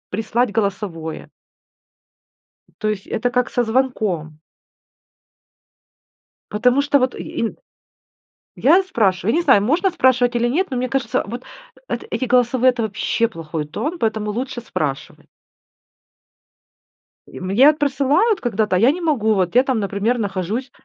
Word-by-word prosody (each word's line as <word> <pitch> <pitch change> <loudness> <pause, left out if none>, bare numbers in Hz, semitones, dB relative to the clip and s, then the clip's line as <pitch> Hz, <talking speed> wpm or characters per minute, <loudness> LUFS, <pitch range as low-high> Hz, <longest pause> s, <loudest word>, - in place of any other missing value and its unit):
прислать 225 +4 -1
голосовое. 190 -7 -3 1.5
То 215 - -1
есть 205 -2 -4
это 245 +3 -1
как 250 0 +1
со 245 - 0
звонком. 215 - -1 2.1
Потому 250 +6 +3
что 285 0 +2
вот 255 0 0
и - - -5
ин 225 - -2 1.0
Я 340 +8 +4
спрашиваю. 210 - 0
Я - - +2
не 345 - -1
знаю, 265 -9 +5
можно 325 - +2
спрашивать 255 -7 +2
или 240 0 +2
нет, 350 +10 0
но 255 - -2
мне 250 +1 -2
кажется, 265 -4 -1
вот 240 +4 -6 0.4
эт - - -4
эти 260 - -1
голосовые- 250 +1 +3
это 245 -2 -4
вообще 220 +2 0
плохой 165 -6 -5
тон, 295 - -4
поэтому 215 -1 -1
лучше 245 +2 -4
спрашивать. 145 - -5 2.0
И - - -10
мне 235 +11 +4
присылают 295 - +1
когда-то, 215 -4 0
а 185 - +2
я 245 +6 +5
не 360 - -5
могу, 255 -10 +1
вот 185 +1 0
я 250 - +6
там, 260 -4 0
например, 205 +4 -1
нахожусь, 205 +5 -3
235 Hz, 140 wpm, -20 LUFS, 205-260 Hz, 2.1 s, я